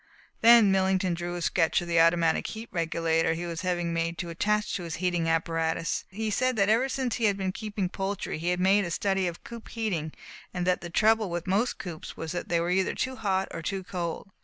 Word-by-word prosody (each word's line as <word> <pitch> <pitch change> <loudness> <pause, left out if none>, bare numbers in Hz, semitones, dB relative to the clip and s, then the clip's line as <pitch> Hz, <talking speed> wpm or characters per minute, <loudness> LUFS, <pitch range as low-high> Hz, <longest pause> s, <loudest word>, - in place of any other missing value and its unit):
Then 230 -3 +7
Millington 190 -1 +2
drew 175 +1 -4
a 175 - -4
sketch 165 -2 +2
of 175 - -6
the 170 -1 +2
automatic 165 0 +3
heat 225 +1 -7
regulator 165 -1 +1
he 170 +2 -4
was 170 -1 -4
having 175 -2 -1
made 165 0 -1
to 170 0 -4
attach 210 +5 0
to - - -2
his 170 -2 -5
heating 175 -2 0
apparatus. 165 0 0
He 215 +3 -3
said 255 +4 +1
that 200 -1 +2
ever 240 +5 +3
since 255 -3 -1
he 230 - +1
had 200 -2 +2
been 190 -1 -1
keeping 210 -2 -3
poultry 195 -2 -3
he 170 +2 -1
had 180 0 0
made 195 +2 +4
a 175 - -3
study 195 +2 0
of 170 -1 -6
coop 235 -1 -10
heating, 185 -9 -2 0.4
and 180 0 -1
that 180 0 +1
the 175 - -6
trouble 215 +3 +3
with 175 0 -3
most 205 +6 +1
coops 175 -7 -8
was 160 -1 -5
that 175 - -4
they 170 - +2
were 170 +1 -1
either 190 +1 +1
too 260 0 -2
hot 195 -4 0
or 165 - -5
too 190 +3 -3
cold. 180 +1 -5
180 Hz, 230 wpm, -27 LUFS, 170-205 Hz, 0.4 s, Then